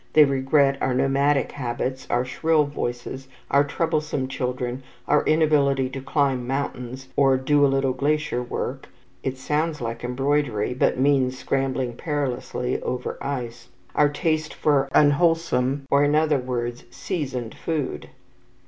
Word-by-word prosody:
They 155 - +8
regret 135 0 +2
our 130 - +1
nomadic 135 +2 +2
habits, 130 0 -4
our 125 +1 +1
shrill 155 +5 +2
voices, 130 -1 -5 0.2
our 140 +1 +5
troublesome 150 -2 -1
children, 125 -1 -3 0.3
our 150 0 +3
inability 145 -4 +3
to 135 0 -6
climb 135 -3 0
mountains 130 -1 -4
or 135 -2 +4
"do 145 +2 +2
a - - +7
little 135 -1 +1
glacier 145 -1 0
work" 125 +2 -5 0.3
(it 130 -1 -3
sounds 150 +4 -1
like 115 -1 -5
embroidery, 125 -3 0
but 125 - +1
means 130 -1 +2
scrambling 130 -2 -1
perilously 130 -3 -2
over 125 0 -4
ice), 120 -4 -4 0.3
our 150 -1 +4
taste 155 0 -1
for 140 -3 +2
unwholesome 145 -3 +2
or, 140 +1 +5
in 145 +1 +3
other 155 -2 +3
words, 120 -1 -4
seasoned 130 - -4
food. 155 -5 -3
135 Hz, 135 wpm, -24 LUFS, 125-145 Hz, 0.3 s, They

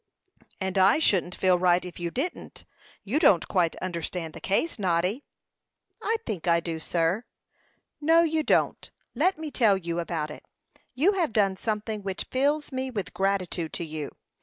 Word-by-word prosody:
"And 190 0 -1
I 190 +6 +6
shouldn't 185 - +2
feel 185 -1 +3
right 180 0 +3
if 180 -1 -9
you 170 0 -2
didn't. 280 - -5 0.4
You 225 +9 0
don't 205 - +4
quite 175 -4 +1
understand 170 -2 -4
the - - -10
case, 230 - 0
Noddy." 185 +7 0 0.8
"I 450 - +1
think 190 -5 -4
I 170 0 +4
do, 165 -1 -4
sir." 170 +6 0 0.8
"No, 325 +3 +5
you 320 -1 +1
don't. - - +1 0.2
Let 375 +1 +2
me 315 -1 -6
tell 215 -8 +4
you 170 -2 -3
about 160 -3 -3
it. - - -10 0.5
You 315 +10 +4
have 355 - 0
done 200 -3 +2
something 215 +1 -3
which 195 -1 -3
fills 290 +3 +1
me 260 0 -2
with 210 -7 -4
gratitude 185 -3 -1
to 170 - -3
you. 155 -2 -5
190 Hz, 165 wpm, -27 LUFS, 175-260 Hz, 0.8 s, I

